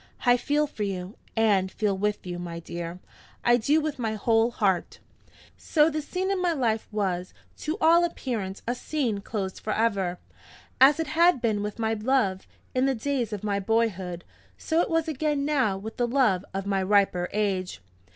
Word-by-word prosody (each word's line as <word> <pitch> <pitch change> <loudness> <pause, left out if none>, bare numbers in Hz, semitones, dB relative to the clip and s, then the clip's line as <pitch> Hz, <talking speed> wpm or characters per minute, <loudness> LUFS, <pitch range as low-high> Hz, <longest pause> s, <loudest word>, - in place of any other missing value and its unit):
I 245 0 +6
feel 295 +4 +1
for 285 -7 -9
you, 195 -1 -3 0.2
and 200 -4 +2
feel 210 -2 0
with 205 +1 -2
you, 175 -1 -5
my 170 -1 -5
dear 170 +1 -6 0.5
I 240 0 +6
do, 285 +7 +2
with 305 -3 -3
my 220 -2 -1
whole 225 +2 +2
heart." 195 -7 0 0.6
So 310 0 +3
this 305 -1 -4
scene 375 +1 -1
in 385 -2 0
my 350 -2 +2
life 230 -7 0
was, 185 -4 -2 0.2
to 310 +4 -3
all 335 +2 +5
appearance, 225 - -3
a 240 - +1
scene 250 -5 -2
closed 200 -2 -4
forever. 200 -5 0 0.6
As 285 +4 +7
it 325 - 0
had 330 +1 +4
been 220 -3 0
with 210 0 -4
my 225 -1 0
love, 215 -4 0 0.3
in 255 +1 +2
the 270 - +1
days 245 -1 -2
of 210 -2 -5
my 200 -1 0
boyhood, 195 -5 -1 0.3
so 325 +1 +1
it - - -1
was 325 0 +1
again 295 -1 -1
now 265 -10 +1
with 220 +3 -8
the 245 - +1
love 235 -8 +2
of 195 0 -4
my 195 -1 0
riper 190 -2 +2
age! 195 - -1
220 Hz, 180 wpm, -26 LUFS, 195-280 Hz, 0.6 s, As